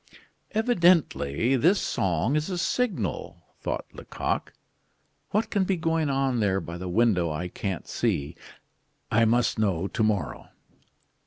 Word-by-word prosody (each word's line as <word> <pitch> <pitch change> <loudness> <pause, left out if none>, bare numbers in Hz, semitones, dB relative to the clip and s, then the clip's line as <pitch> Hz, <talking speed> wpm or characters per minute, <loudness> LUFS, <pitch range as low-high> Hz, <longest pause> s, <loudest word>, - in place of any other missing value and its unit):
"Evidently 170 - +3
this 170 - +4
song 95 - 0
is 155 +3 0
a 180 - -2
signal," 230 +5 -2 0.2
thought - - -3
Lecoq. - - -3 0.8
"What 220 +2 0
can 200 -2 +2
be 190 0 0
going 165 -2 0
on 135 -2 +1
there 100 -3 +2
by 85 -2 -7
the 90 0 -5
window 95 -4 +2
I 80 +4 -3
can't 95 0 -4
see? 75 +3 -1 0.8
I 115 +1 +4
must 120 0 +2
know 95 -5 +1
to 115 - -3
morrow." 100 -9 -1
115 Hz, 135 wpm, -26 LUFS, -, 0.8 s, this